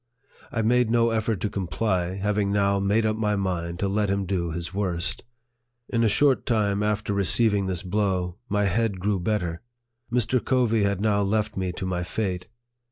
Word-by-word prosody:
I 115 - -1
made 120 +1 +3
no 115 0 +3
effort 110 -2 0
to 105 - 0
comply, 90 0 -1
having 100 0 0
now 100 -1 +2
made 100 +3 +2
up 110 0 +1
my 105 -1 0
mind 85 -3 -2
to 100 - +1
let 100 +1 0
him 100 0 0
do 90 -2 -1
his 85 +2 -5
worst. 85 -4 -1 0.7
In 115 -1 +1
a - - +4
short 130 +6 +3
time 105 -4 +1
after 105 0 0
receiving 100 0 +2
this 90 -2 -3
blow, 95 -1 -1
my 105 0 +1
head 100 0 0
grew 100 +1 0
better. 90 -3 -1 0.5
Mr. 120 -1 +1
Covey 120 -4 +2
had 100 -1 0
now 105 -1 +2
left 105 +1 0
me 95 -1 -1
to 95 - -5
my 90 -1 -1
fate. 90 -1 -3
100 Hz, 180 wpm, -25 LUFS, 95-110 Hz, 0.7 s, a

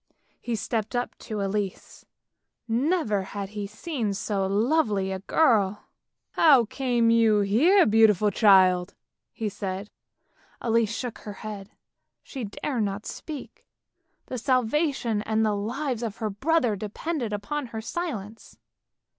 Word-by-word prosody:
He 240 - -2
stepped 220 +1 -3
up 245 0 -2
to 215 -3 -5
Elise: 195 -1 -4 0.6
never 240 - +1
had 195 +1 -6
he 205 -1 -5
seen 220 -1 -3
so 195 -1 -1
lovely 210 -2 +1
a 190 - -3
girl. 210 -4 +2 0.2
" - - -58
How 275 -7 +5
came 240 -1 +1
you 225 -2 +4
here, 300 - +4
beautiful 215 -2 +4
child? 185 -4 +4 0.2
" - - -61
he 220 - -4
said. 195 0 -5 0.7
Elise 230 -2 +1
shook 240 +1 -5
her 210 - -8
head; 205 -2 -6 0.5
she 260 -5 -6
dared 235 +4 -3
not 205 0 -2
speak; 300 -4 -8 0.6
the 255 - -5
salvation 255 -2 +1
and 220 +1 +1
the 215 - +1
lives 245 +4 -3
of 225 -3 -4
her 215 -2 -2
brothers 250 - +1
depended 235 - -3
upon 255 +7 -3
her 225 -1 -6
silence. 225 - -6
220 Hz, 135 wpm, -26 LUFS, 205-255 Hz, 0.7 s, How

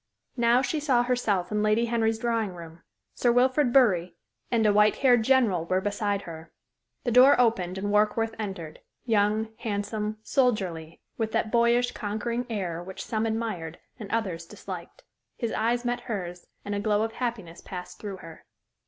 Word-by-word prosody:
Now 240 +2 +4
she 310 - -1
saw 265 -5 +2
herself 215 -7 0
in 210 0 0
Lady 215 +2 +2
Henry's 225 -1 +1
drawing 225 -4 -1
room; 165 -1 -11 0.3
Sir 240 - +2
Wilfrid 255 +2 +3
Bury 195 -10 +3 0.3
and 225 -2 +2
a 210 - +4
white 210 +1 +4
haired 250 -3 +4
general 220 -9 +2
were 185 +2 +1
beside 205 0 -1
her. 160 -1 -10 0.5
The 240 - -1
door 255 +3 +7
opened 190 -7 +1
and 205 +1 -2
Warkworth 215 +2 +2
entered 190 -7 -6 0.3
young, 215 -1 +1
handsome, 210 0 -3
soldierly, 190 - -1 0.2
with 220 -1 -1
that 215 - 0
boyish, 235 +1 +3
conquering 235 +3 -3
air 180 -6 -3
which 190 +2 -8
some 220 0 -1
admired 220 -8 -3 0.2
and 210 -3 -7
others 185 -8 -2
disliked. - - -9 0.3
His 230 -3 -2
eyes 240 +2 0
met 245 0 0
hers, 180 -6 -5 0.2
and 205 - -3
a 200 - -1
glow 210 +1 +1
of 225 - -2
happiness 220 -9 -5
passed 180 -1 -8
through 200 -3 -6
her. 165 -1 -12
215 Hz, 165 wpm, -27 LUFS, 190-235 Hz, 0.5 s, door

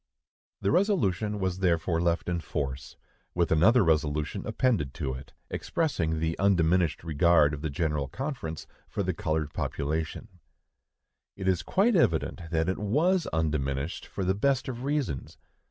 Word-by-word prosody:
The 100 - +1
resolution 105 - +1
was 95 -1 -1
therefore 85 -2 +1
left 85 0 0
in 90 -1 0
force, 70 -4 -4 0.4
with 85 -1 +1
another 100 +9 +5
resolution 75 -2 0
appended 95 - 0
to 70 -5 -2
it, 65 +1 -9 0.2
expressing 85 - -1
the 80 +1 0
undiminished 90 -4 +2
regard 80 -1 +4
of 75 - -5
the 80 - -2
General 75 -1 -1
Conference 125 - -5 0.2
for 100 - -2
the 95 0 -1
colored 80 -2 -2
population. 80 +4 -3 1.0
It 95 -1 -4
is 90 -2 +2
quite 200 - +2
evident 85 - +2
that 80 0 0
it 95 - -1
was 160 - +2
undiminished, 75 -1 -2
for 95 - -4
the 95 - +2
best 130 +5 +1
of 125 0 -5
reasons. 140 - -2
85 Hz, 145 wpm, -28 LUFS, 80-105 Hz, 1.0 s, another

